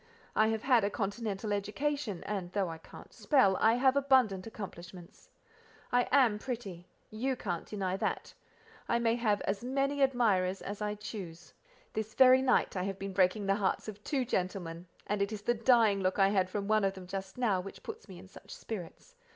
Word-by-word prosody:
I 215 - +4
have 220 0 -1
had 250 -5 +4
a 200 - +1
continental 210 0 -3
education, 210 +1 -2
and 190 -4 -4
though 195 -4 0
I 165 -1 -7
can't - - -14
spell, 255 -10 +3
I 225 +1 +5
have 260 +2 +3
abundant 255 -9 +3
accomplishments. 180 -4 -10 0.6
I 245 0 +3
am 245 -7 +4
pretty; 205 -9 -6 0.2
you 255 +5 -1
can't 175 -8 -4
deny 190 -3 -2
that; - - -3 0.6
I 235 - +3
may 230 -1 +2
have 220 -4 +1
as 195 +3 -2
many 275 +2 0
admirers 210 -8 +2
as 205 +1 -6
I 210 0 -1
choose. 185 -6 -8 0.4
This 220 0 -4
very 260 0 +7
night 255 -5 +2
I 185 - -1
have 195 +1 -3
been 195 0 -5
breaking 190 +2 +2
the 195 - +3
hearts 200 +1 -1
of 210 -1 -8
two 275 -4 -1
gentlemen, 180 -5 -3 0.2
and 205 0 -1
it 200 +1 0
is 210 -2 -6
the 240 - +2
dying 230 -3 +4
look 185 0 0
I 195 -1 +5
had 190 -2 +1
from 200 +1 -3
one 215 0 +3
of 195 0 0
them 190 -1 -9
just 190 +2 -6
now, 210 -7 +1
which 195 +2 -10
puts 445 - -8
me 185 - -10
in 190 +2 -12
such 190 - -12
spirits. 220 - -8
210 Hz, 195 wpm, -31 LUFS, 190-240 Hz, 0.6 s, very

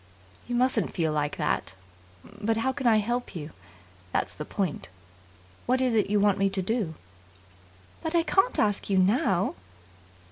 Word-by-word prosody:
"You 245 - -2
mustn't 245 -4 +3
feel 160 -3 0
like 150 -1 -1
that. 90 - -1 0.8
How 230 +4 0
can 265 -2 -1
I 225 -2 +5
help 240 +1 -2
you? 155 -2 -6 0.6
That's - - -1
the 150 - -6
point. 185 - -3 0.8
What 255 +1 +2
is 255 -2 +1
it 215 -3 +2
you 210 0 +3
want 200 -1 +3
me 195 0 +3
to 195 0 -1
do?" 200 -6 -1 1.1
"But 320 +1 -3
I 335 - +4
can't 385 +7 +2
ask 205 -1 0
you 195 - +2
now." 190 -1 +2
210 Hz, 155 wpm, -27 LUFS, 185-245 Hz, 1.1 s, I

